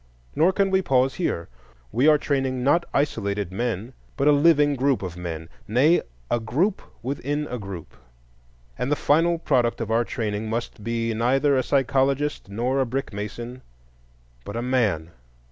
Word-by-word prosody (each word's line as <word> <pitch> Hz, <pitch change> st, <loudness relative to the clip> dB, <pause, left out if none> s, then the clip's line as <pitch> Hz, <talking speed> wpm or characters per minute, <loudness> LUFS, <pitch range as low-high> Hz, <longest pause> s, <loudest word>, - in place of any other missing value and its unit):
Nor 170 Hz, +4 st, +4 dB
can 195 Hz, +1 st, +1 dB
we 190 Hz, 0 st, +3 dB
pause 130 Hz, -5 st, +2 dB
here. 85 Hz, -, -2 dB, 0.4 s
We 125 Hz, +7 st, +3 dB
are 155 Hz, -1 st, +7 dB
training 135 Hz, -3 st, -1 dB
not 170 Hz, +6 st, +3 dB
isolated 105 Hz, -, -1 dB
men 115 Hz, +3 st, -3 dB, 0.2 s
but 140 Hz, +1 st, +2 dB
a -, -, +7 dB
living 145 Hz, -1 st, +4 dB
group 135 Hz, -3 st, +1 dB
of 90 Hz, -2 st, -5 dB
men,—nay, 90 Hz, -, 0 dB, 0.3 s
a 120 Hz, -, +2 dB
group 145 Hz, -, 0 dB, 0.2 s
within 145 Hz, +3 st, -2 dB
a 125 Hz, -, -4 dB
group. 95 Hz, -5 st, -8 dB, 0.8 s
And 125 Hz, -, -1 dB
the -, -, +4 dB
final 165 Hz, +4 st, +3 dB
product 125 Hz, -7 st, +1 dB
of 115 Hz, -1 st, -3 dB
our 115 Hz, +1 st, +3 dB
training 110 Hz, -2 st, -3 dB
must 115 Hz, -1 st, -4 dB
be 115 Hz, 0 st, -1 dB
neither 135 Hz, +5 st, +2 dB
a 130 Hz, -, +3 dB
psychologist 135 Hz, 0 st, +1 dB
nor 125 Hz, +6 st, 0 dB
a -, -, +2 dB
brickmason, 120 Hz, 0 st, -5 dB, 0.8 s
but 100 Hz, -, -7 dB
a 120 Hz, -, -2 dB
man. 105 Hz, -11 st, 0 dB
125 Hz, 155 wpm, -24 LUFS, 110-145 Hz, 0.8 s, are